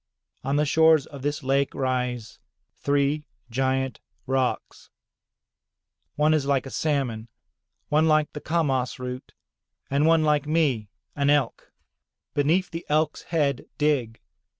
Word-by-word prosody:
On 135 +2 0
the 150 +1 +3
shores 160 -1 +5
of 140 -2 -10
this 145 +1 -2
lake 135 +1 +1
rise 125 -3 -2 0.4
three 145 +1 +1 0.3
giant 130 +1 0 0.3
rocks. 130 0 -2 1.3
One 150 +1 +3
is 145 -3 +1
like 140 -2 +1
a 135 - -8
salmon, 130 -8 -1 0.6
one 155 +2 +3
like 155 -1 +2
the 150 - -6
kamas 135 -6 0
root, 125 0 -7 0.6
and 145 +3 +3
one 165 -1 +4
like 150 -1 +2
me, 140 -10 +1 0.3
an 140 0 +1
Elk. 145 -5 +1 0.6
Beneath 165 +6 +1
the 165 +1 -5
Elk's 155 0 +1
head, 145 -6 0
dig. 135 -7 0
140 Hz, 125 wpm, -25 LUFS, 130-155 Hz, 1.3 s, shores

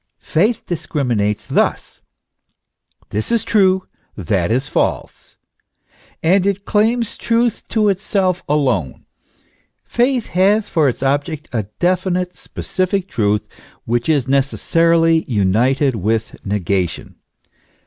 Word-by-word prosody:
Faith 210 +8 0
discriminates 120 - -1
thus: - - -1 1.1
This 105 - -2
is 235 -3 +2
true, 190 -3 +2 0.3
that 95 -1 0
is 130 +4 0
false. - - -3 0.9
And 185 +4 +3
it 200 0 -1
claims 225 +1 +1
truth 235 -1 0
to 215 -2 +2
itself 190 -2 0
alone. 130 - 0 0.8
Faith 245 0 0
has 200 +4 +2
for 155 -4 +2
its 125 - -4
object 145 +3 -1
a 110 -4 -2
definite, 180 0 0
specific 185 0 -3
truth, 105 -2 0 0.4
which 120 +4 -1
is 145 -6 +2
necessarily 165 +4 +2
united 125 +6 +2
with 110 +2 -1
nega 95 -3 0
tion. - - -11
160 Hz, 110 wpm, -18 LUFS, 115-195 Hz, 1.1 s, And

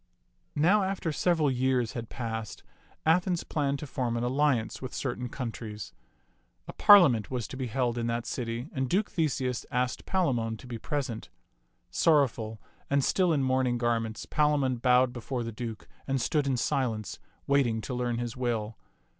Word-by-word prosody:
Now 180 +8 +4
after 190 -4 -1
several 160 -2 +2
years 125 -2 +1
had 115 -2 -5
passed, 110 -3 -5 0.4
Athens 175 +2 +2
planned 140 -3 -1
to 150 - -6
form 125 -4 -2
an 115 - -1
alliance 130 -3 +1
with 130 - -6
certain 125 -2 -3
countries. 115 -5 -6 0.7
A - - -7
parlia 200 -9 +8
ment 110 -3 -3
was 125 -4 -3
to - - -7
be 130 -1 -3
held 120 0 -1
in 115 - -1
that 120 0 -2
city, 120 +1 -3
and 130 -1 -1
Duke 205 +3 +1
Theseus 130 -6 -1
asked 125 0 -1
Palamon 120 -12 0
to 120 - -13
be 120 -2 -6
present. 135 -7 -3 0.6
Sorrowful 120 -8 +2 0.3
and 140 -1 +2
still 180 +3 +2
in 145 -4 +2
mourning 130 -2 +1
garments, 115 -2 -1
Palamon 145 -4 +1
bowed 125 +1 +3
before 125 0 -4
the 115 - -4
Duke 110 -6 -6 0.2
and 135 -1 0
stood 145 +3 +1
in 130 -2 +1
silence, 115 -4 -1 0.3
waiting 135 -5 +2
to 125 - -5
learn 120 -1 -1
his 120 -1 -3
will. 115 -4 -2
125 Hz, 165 wpm, -29 LUFS, 115-140 Hz, 0.7 s, parlia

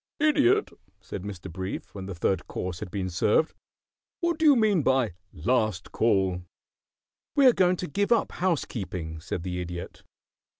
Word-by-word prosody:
"Idiot," 310 +7 +3 0.3
said - - -7
Mr. 95 -2 -7
Brief, 95 +2 -5
when 95 -2 -7
the 95 - -5
third 90 +1 0
course 90 -2 -4
had - - -6
been 95 0 -3
served, 105 - +2 0.7
"what 340 -2 0
do 320 - +2
you 290 -2 +8
mean 215 -7 +3
by 130 - +2 0.2
'Last 110 0 0
Call?'" 95 -5 +2 0.9
"We 285 -2 +5
are 250 - +8
going 185 -2 +3
to 180 - -4
give 200 +9 -1
up 235 - +3
housekeeping," 95 - -2
said 85 +1 -4
the 90 -1 -3
Idiot. 85 0 -7
105 Hz, 160 wpm, -27 LUFS, -, 0.9 s, you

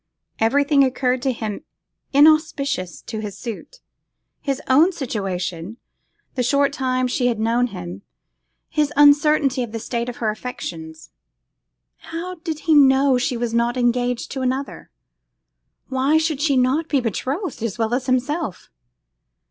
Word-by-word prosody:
Everything 280 +5 +3
occurred 255 -1 0
to 265 - +1
him 220 +1 -5 0.5
inauspicious 280 - +2
to 220 - -6
his 205 -2 -6
suit; 240 - -8 0.6
his 275 -2 -2
own 305 +8 +5
situation, 195 - -4 0.6
the 255 - -1
short 280 +3 +2
time 255 -1 0
she 245 0 0
had 235 -3 -1
known 235 +3 +1
him, 90 - -8 0.7
his 300 -1 0
uncertainty 290 -2 +4
of 235 -2 -5
the 225 - -3
state 235 +1 -3
of 245 - -7
her 220 -2 0
affections. 160 -9 -8 0.9
How 340 +3 -6
did 315 -3 -4
he 315 +2 +2
know 270 -2 +5
she 245 -1 -1
was 235 -1 -2
not 235 +1 +1
engaged 245 0 0
to 265 - -4
another? 260 +2 -3 1.0
why 265 +4 +2
should 315 -3 -1
she 285 -3 +2
not 265 +6 +1
be 285 - +2
betrothed 260 - -3
as 230 -2 -3
well 225 0 -1
as 255 +1 -1
himself? 260 - -2
255 Hz, 140 wpm, -21 LUFS, 230-285 Hz, 1.0 s, own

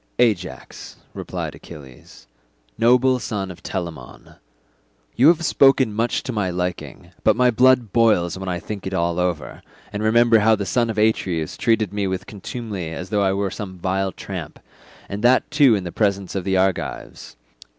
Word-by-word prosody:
"Ajax," 105 -7 -2 0.2
replied - - -5
Achilles, 65 -5 -14 0.5
"noble 125 - +3
son 100 -4 -4
of 90 - -13
Telamon, 85 -9 -7 0.8
you 130 - +5
have 170 0 +4
spoken 135 -6 +4
much 115 +3 -1
to - - -4
my 105 -4 -1
liking, 90 -1 -5
but - - +4
my 125 +1 +3
blood 125 -2 +3
boils 105 -8 +3
when 95 0 -5
I 90 - -1
think 100 +1 -7
it 95 - -3
all 85 0 0
over, 85 -7 -3 0.3
and 105 - -3
remember 115 +1 +4
how 110 +1 +4
the 100 -1 -4
son 120 +2 0
of 110 - -4
Atreus 95 -7 0
treated 110 -4 0
me 100 -1 -1
with 95 0 -3
contumely 105 -3 -6
as 90 +3 -7
though 105 -1 +1
I 95 -1 +2
were 100 -1 -1
some 95 -3 -7
vile 95 +2 -1
tramp, - - -8 0.5
and 100 +2 -6
that 125 +4 +3
too 145 -6 +5
in 100 - -3
the 90 - -6
presence 100 -2 -1
of 95 -2 -3
the 95 -1 +1
Argives. 95 -1 -2
100 Hz, 170 wpm, -21 LUFS, 90-115 Hz, 0.8 s, you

